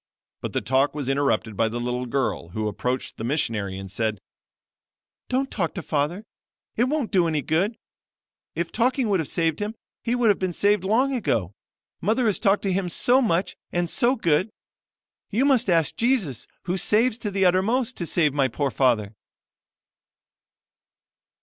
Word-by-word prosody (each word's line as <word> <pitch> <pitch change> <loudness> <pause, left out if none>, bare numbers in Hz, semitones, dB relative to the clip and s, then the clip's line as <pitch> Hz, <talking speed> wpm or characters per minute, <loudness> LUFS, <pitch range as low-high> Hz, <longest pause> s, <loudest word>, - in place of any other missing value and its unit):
But - - -5
the - - 0
talk 135 +3 +1
was 145 -4 -3
interrupted 135 -6 0
by 115 - +2
the 120 +2 -4
little 125 +1 -2
girl, 130 -8 -1
who 110 +4 -3
approached 125 +5 -3
the - - -6
missionary, 115 -8 -1
and 95 -1 -8
said: 110 -1 -1 1.1
'Don't 265 +1 0
talk 170 -6 -2
to 180 - -4
father; 155 +9 -1 0.5
it 240 - +3
won't 280 -3 -1
do 180 -4 +3
any 155 -3 -1
good. 185 - 0 0.8
If 170 0 -2
talking 250 0 +1
would 195 -3 +2
have 160 - -2
saved 165 -2 0
him, 210 +2 -3 0.3
he 235 - 0
would 245 -3 +3
have 205 - +3
been 185 -2 -1
saved 205 +1 +2
long 245 +8 +2
ago. 110 - -1 0.5
Mother 225 +6 +1
has 210 -4 +2
talked 200 -1 +2
to 195 -2 0
him 185 -1 -1
so 250 +9 +3
much 190 -6 0 0.2
and 175 0 0
so 245 +8 +2
good. 175 - +1 0.8
You 235 +6 +1
must 255 -6 +3
ask 165 -4 +2
Jesus, 225 - 0 0.2
who 180 +1 -1
saves 220 +5 +2
to 210 - -3
the 195 -1 +1
uttermost, 220 +8 +2
to 170 - -3
save 155 -5 +2
my 140 -2 +2
poor 135 +3 -2
father.' 115 -6 +1
175 Hz, 170 wpm, -24 LUFS, 135-220 Hz, 1.1 s, it